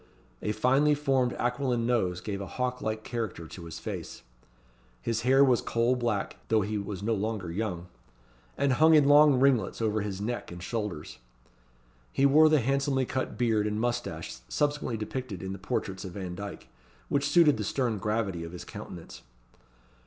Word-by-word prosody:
A 105 - -1
finely 135 +7 +3
formed 135 -4 +1
aquiline 125 -1 -1
nose 95 -8 0
gave 100 0 -4
a 100 - -5
hawk 125 +4 -3
like 110 0 -3
character 110 -9 -4
to 85 +1 -10
his 80 - -7
face; - - -6 0.8
his 115 - -2
hair 135 +3 +5
was 125 -3 +3
coal 120 +2 +1
black 120 -5 -2
(though 110 -1 +3
he 105 +1 -2
was 100 -1 -5
no 115 +2 +1
longer 105 -4 -2
young), 90 -2 -3 0.7
and 140 -2 +2
hung 160 +5 +6
in 145 -2 +5
long 145 -2 +7
ringlets 130 -6 +2
over 110 -1 0
his 100 -2 -4
neck 120 +1 -4
and 85 0 -8
shoulders. 105 - -4 0.9
He 135 - +2
wore 155 +3 +7
the 155 -3 +4
handsomely 135 +1 +1
cut 130 +1 -3
beard 110 -4 +2
and 105 0 -2
moustache 120 - -3
subsequently 145 - 0
depicted 110 -3 -5
in 95 0 -4
the 95 - -8
portraits 95 -1 -3
of 95 -3 -7
Vandyke, 95 +1 -6 0.4
which 140 0 0
suited 160 -7 +5
the 105 - -2
stern 115 0 -1
gravity 100 -4 -1
of 85 +1 -8
his 90 - -8
countenance. 85 -2 -9
115 Hz, 170 wpm, -28 LUFS, 100-130 Hz, 0.9 s, long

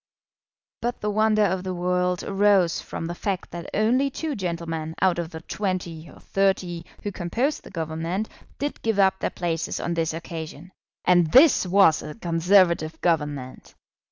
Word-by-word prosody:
But 240 +1 -2
the 210 - -1
wonder 215 0 +3
of 185 -1 -1
the 185 -1 -3
world 180 0 0
arose 195 -3 +3
from - - -6
the 170 - -3
fact 190 +1 -3
that 170 +1 -7
only 245 +6 +2
two 305 +2 -4
gentlemen 165 -4 -4
out 185 -2 +2
of 170 -2 -3
the 160 -2 -8
twenty 175 -5 -4
or - - -16
thirty 185 -3 -1 0.2
who 205 - -2
composed 235 - -1
the - - -11
Government 165 +4 -3 0.3
did 290 +2 -4
give 225 -2 0
up 190 -1 +3
their - - -1
places 165 -3 -3
on 170 - -2
this 165 -1 0
occasion. 165 +1 -7 0.3
And 175 -3 +4
this 265 - +6
was 180 -4 +5
a 150 - -8
Conservative 170 -3 +2
Government! 150 -6 -2
180 Hz, 160 wpm, -24 LUFS, 165-200 Hz, 0.3 s, this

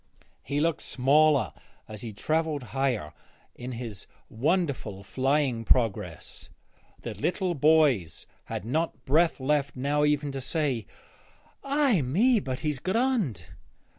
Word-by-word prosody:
He 140 +2 -2
looked 160 0 +1
smaller 140 -1 +3 0.3
as 105 -1 -7
he 115 - -5
travelled 155 +5 -1
higher 130 - -1 0.4
in 125 +1 -7
his 115 -5 -6 0.2
wonderful 130 - -1
flying 130 +1 0
progress. 115 -3 -1 0.5
The - - -4
little 180 0 -1
boys 145 - +3 0.2
had 95 - -5
not 130 -1 -2
breath 160 +4 +3
left 140 +1 0
now 145 +3 0
even 150 -1 +1
to 135 -1 -5
say, 135 - -1 0.8
'Ay 275 - +2
me, 210 - +3
but 130 -8 -4
he's 150 -3 -1
grond.' 200 - 0
140 Hz, 120 wpm, -27 LUFS, 125-160 Hz, 0.8 s, smaller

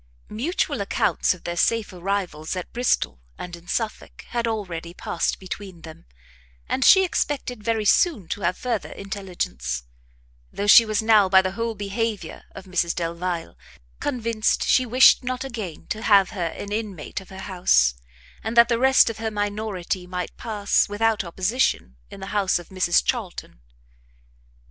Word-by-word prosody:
Mutual 270 +12 -1
accounts - - +1
of 175 - -18
their 175 - -4
safe 220 +3 +1
arrivals 180 -4 -3
at 180 - -6
Bristol 145 - 0 0.2
and 175 -1 -7
in 170 0 -17
Suffolk, 220 +3 -4
had 235 -1 -1
already 180 -6 -4
passed 170 - -2
between 190 -2 -8
them, 160 - -12 0.6
and 265 - 0
she 380 +6 +7
expected 265 - -2
very 225 -1 0
soon 215 - +3
to 205 - -3
have 180 0 0
further 240 -4 -3
intelligence; 185 - -4 0.7
though 200 - -3
she 225 +2 +8
was 215 0 0
now, 215 -3 +5
by 190 0 +7
the 185 - -1
whole 230 +3 -3
behaviour 205 -3 -4
of - - -9
Mrs 180 -2 0
Delvile, 170 - -3 0.4
convinced 230 -5 0
she 255 -1 +3
wished 255 +2 +6
not 255 +1 -3
again 220 - -6
to 215 - -3
have 200 -4 +4
her 180 -6 -2
an 200 +5 -7
inmate 205 -6 -4
of 190 - -16
her 190 - -10
house, 180 - +2 0.5
and 225 +2 -4
that 235 +1 +7
the 235 -1 +1
rest 265 +1 +5
of 225 -1 -3
her 225 0 -2
minority 205 -3 -3
might 180 -1 -5
pass, 210 -4 0
without 215 0 +1
opposition; 185 - -1
in - - -11
the - - -5
house 200 -2 +2
of 175 - -10
Mrs 185 -2 +2
Charlton. 210 - -4
200 Hz, 160 wpm, -23 LUFS, 180-225 Hz, 0.7 s, she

